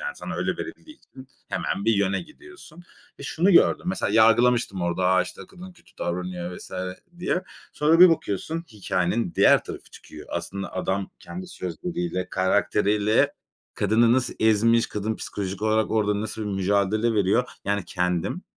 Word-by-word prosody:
yani, 485 -1 -5
sana - - -6
öyle - - -1
verildiği 310 0 -9
için 130 - -15 0.2
hemen 100 +2 -2
bir 115 - +4
yöne 100 -1 0
gidiyorsun 310 - -15 0.4
ve - - -7
şunu 175 +5 +1
gördüm 175 - +4
mesela 180 - -1
yargılamıştım 115 -3 +4
orada, 85 +1 0
"A, 95 0 +4
işte - - -9
kadın 185 0 -12
kötü 175 - -23
davranıyor." 90 +1 -3 0.2
vs. - - -11 0.5
diye. 180 +1 -1 0.3
Sonra 160 +3 +3
bir 180 - +11
bakıyorsun 160 - -2
hikâyenin 95 0 -1
diğer - - +5
tarafı - - -9
çıkıyor. - - -12
Aslında 100 0 -5
adam 95 +1 -2
kendi 185 0 -8
sözleriyle, 170 - -4
karakteriyle 105 +2 +2 0.4
kadını 115 +3 +3
nasıl 130 0 0
ezmiş; 115 +2 +4
kadın 105 +1 -3
psikolojik 100 0 -5
olarak 110 0 +1
orada 105 -2 +1
nasıl 110 0 -4
bir - - -4
mücadele 100 +4 +1
veriyor. 105 +5 +2 0.2
Yani, 100 -2 -1
kendim 90 - -2
110 Hz, 150 wpm, -24 LUFS, 95-150 Hz, 0.5 s, bir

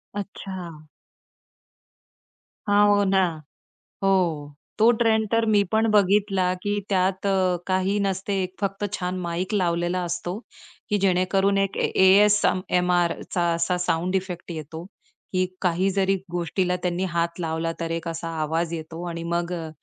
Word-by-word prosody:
अच्छा. 185 -6 -7 1.8
हां. 205 0 +5
हो 205 0 +4
ना, 190 -1 +3 0.8
हो, 165 -7 +1 0.2
तो 220 +2 +6
ट्रेंड 220 -1 +2
तर 230 0 +3
मी 205 -1 +5
पण 220 +1 +3
बघितला, 195 -2 +3
की 205 0 -1
त्यात 190 0 0
अ, 185 -2 +2
काही 190 +2 +1
नसते. 195 0 -1
1 185 0 -5
फक्त 200 0 -2
छान 180 -2 -3
माईक 175 +3 -3
लावलेला 175 -1 0
असतो, 175 +2 -3 0.5
की 210 - +2
जेणेकरून 195 +2 +2
एक 195 0 0
ए - - +1 0.2
ए-एस-एम-आरचा 185 -3 +3
असा 170 +2 0
साउंड 175 +3 0
इफेक्ट 180 -2 -5
येतो 160 +1 -7 0.5
की 185 0 +2 0.2
काही 180 +1 +1
जरी 195 0 +1 0.2
गोष्टीला 175 +1 0
त्यांनी 180 +1 -1
हात 170 +1 -1
लावला 165 0 -2
तर 165 0 -3
एक 165 0 -3
असा 165 0 -4
आवाज 160 +2 -1
येतो 165 +1 -7
आणि 170 -1 -5
मग 170 +1 -1
अ, 165 -2 -4
185 Hz, 140 wpm, -24 LUFS, 170-195 Hz, 1.8 s, तो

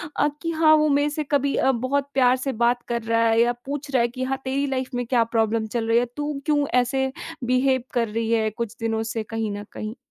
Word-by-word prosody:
अ, 295 - +3
कि 330 -1 -2
हाँ 315 -1 +5
वो 305 0 +3
मेरे 290 +1 +2
से 305 +1 -3
कभी 280 -1 +2
अ, 265 - +3
बहुत 270 +3 -1
प्यार 255 -1 +4
से 270 +1 -2
बात 240 +1 +3
कर 235 -1 -1
रहा 230 0 +2
है 225 0 +3
या 240 +1 +3
पूछ 280 0 -5
रहा 255 -3 +3
है 235 - +3
कि 255 +2 -5
हाँ, 265 +1 -1
तेरी 275 +2 0
लाइफ़ 260 -1 -2
में 245 0 -1
क्या 235 -1 +3
प्रॉब्लम 220 0 +1
चल 225 0 -2
रही 230 - +4
है? 245 - +1
तू 295 0 -2
क्यों 295 -2 +2 0.2
ऐसे 265 +2 -1 0.3
बिहेव 255 +1 +2
कर 235 -2 +1
रही 225 +1 -2
है 220 -1 +2
कुछ 230 +1 -5
दिनों 225 -1 -1
से 225 -2 -2
कहीं 220 -1 -3
न 205 - -6
कहीं। 215 +2 -5
250 Hz, 250 wpm, -23 LUFS, 230-275 Hz, 0.3 s, हाँ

